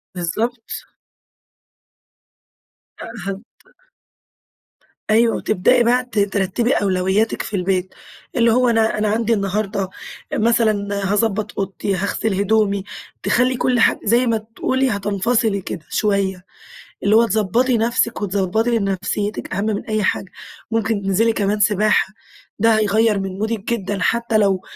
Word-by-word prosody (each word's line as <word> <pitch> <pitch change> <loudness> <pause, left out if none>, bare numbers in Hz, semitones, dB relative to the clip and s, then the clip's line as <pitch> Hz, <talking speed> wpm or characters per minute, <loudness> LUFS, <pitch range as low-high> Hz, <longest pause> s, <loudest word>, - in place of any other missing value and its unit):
بالضبط. 225 +7 -3 2.1
آآ - - -7 0.2
هت 195 0 -4 1.7
أيوه 225 +1 +4
وتبدأي 240 +5 +2
بقى 250 +2 +2
ت 230 -4 -2
ترتبي 200 +5 +1
أولوياتِك 190 +2 +1
في - - -5
البيت، 185 0 -1 0.4
اللي 235 -1 +4
هو 250 +1 +3
أنا 225 -2 +2
أنا 210 0 0
عندي 230 +1 +1
النهارده 195 -1 -1 0.4
مثلًا 215 -3 +1
هاضبط 210 -1 -1
أوضتي، 195 0 -2
هاغسل 200 +2 -1
هدومي، 200 -1 +1 0.4
تخلي 250 +1 +2
كل 250 -1 +1
حاجة - - +3
زي 235 +4 +3
ما 230 -1 +2
تقولي 255 +4 -1
هتنفصلي 205 +1 0
كده 170 -3 -7
شويّة، 195 -3 0 0.6
اللي 205 +2 +3
هو 230 +1 +6
تضبطي 225 +4 +1
نفسِك 230 0 0
وتضبطي 205 +4 0
نفسيتِك 200 +1 -2
أهم 200 +2 -1
من 215 -2 -2
أي 215 -1 -1
حاجة. 190 0 -1 0.4
ممكن 225 -2 0
تنزلي 200 +4 +2
كمان 205 0 0
سباحة 210 -1 +2 0.5
ده 225 0 +4
هيغير 215 0 +2
من 195 0 -5
مودِك 220 +1 -2
جدًا، 200 -3 -3
حتّى 230 +1 +1
لو 195 -3 +2
215 Hz, 125 wpm, -20 LUFS, 195-230 Hz, 2.1 s, هو